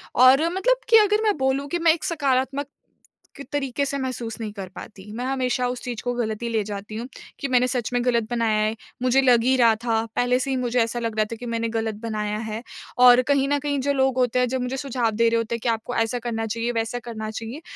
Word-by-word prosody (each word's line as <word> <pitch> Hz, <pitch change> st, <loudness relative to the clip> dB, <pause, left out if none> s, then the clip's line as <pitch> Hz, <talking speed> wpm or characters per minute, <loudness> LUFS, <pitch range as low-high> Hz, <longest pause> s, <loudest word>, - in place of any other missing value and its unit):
और 260 Hz, +5 st, +6 dB
मतलब -, -, +2 dB
कि 455 Hz, -, +8 dB
अगर 420 Hz, 0 st, +4 dB
मैं 420 Hz, -5 st, +2 dB
बोलूँ 265 Hz, +1 st, 0 dB
कि 345 Hz, -, -1 dB
मैं 330 Hz, -1 st, +5 dB
एक 325 Hz, -, -6 dB
सकारात्मक 280 Hz, -4 st, 0 dB, 0.9 s
तरीके 280 Hz, -1 st, -1 dB
से 280 Hz, 0 st, -2 dB
महसूस 245 Hz, -4 st, -4 dB
नहीं 215 Hz, -2 st, -4 dB
कर 195 Hz, -3 st, -6 dB
पाती। 205 Hz, 0 st, -10 dB
मैं 240 Hz, +3 st, -4 dB
हमेशा 255 Hz, -1 st, 0 dB
उस 250 Hz, 0 st, -4 dB
चीज़ 240 Hz, -3 st, -5 dB
को 245 Hz, -, -1 dB
ग़लत 220 Hz, -3 st, -2 dB
ही 235 Hz, -, -2 dB
ले 220 Hz, -2 st, 0 dB
जाती 205 Hz, +1 st, -7 dB
हूँ 235 Hz, +3 st, -5 dB, 0.3 s
कि 280 Hz, -, -2 dB
मैंने 250 Hz, -1 st, +3 dB
सच 250 Hz, -2 st, -2 dB
में 245 Hz, 0 st, +1 dB
ग़लत 235 Hz, -2 st, +2 dB
बनाया 230 Hz, -3 st, +1 dB
है, 215 Hz, +1 st, -1 dB, 0.3 s
मुझे 255 Hz, +1 st, +4 dB
लग 245 Hz, -3 st, +4 dB
ही 260 Hz, +2 st, +3 dB
रहा 230 Hz, -3 st, +5 dB
था। 225 Hz, -1 st, +1 dB
पहले 245 Hz, 0 st, +2 dB
से 265 Hz, -, -2 dB
ही -, -, +1 dB
मुझे 250 Hz, -1 st, 0 dB
ऐसा 230 Hz, +1 st, -3 dB
लग 230 Hz, -2 st, -3 dB
रहा 215 Hz, -, +3 dB
था -, -, -3 dB
कि 245 Hz, -, -8 dB
मैंने 230 Hz, -1 st, -2 dB
ग़लत 225 Hz, -1 st, -2 dB
बनाया 210 Hz, -2 st, -2 dB
है 220 Hz, 0 st, -5 dB, 0.5 s
और 245 Hz, 0 st, +8 dB
कहीं 275 Hz, -1 st, +3 dB
न 290 Hz, 0 st, +2 dB
कहीं 285 Hz, 0 st, -1 dB
जो 285 Hz, +2 st, +1 dB
लोग 265 Hz, -1 st, +1 dB
होते 250 Hz, -1 st, +2 dB
हैं 250 Hz, -, +2 dB
जो 260 Hz, +1 st, -1 dB
मुझे 250 Hz, +2 st, -3 dB
सुझाव 255 Hz, -4 st, -1 dB
दे 230 Hz, +2 st, +2 dB
रहे 230 Hz, -, +1 dB
होते 230 Hz, 0 st, -1 dB
हैं -, -, -5 dB
कि 240 Hz, -, +1 dB
आपको 225 Hz, +2 st, -2 dB
ऐसा 225 Hz, +2 st, 0 dB
करना 225 Hz, -1 st, -3 dB
चाहिए, 230 Hz, +2 st, -2 dB
वैसा 225 Hz, +1 st, -2 dB
करना 225 Hz, -3 st, -6 dB
चाहिए। 225 Hz, +7 st, -7 dB
245 Hz, 250 wpm, -23 LUFS, 225-265 Hz, 0.9 s, कि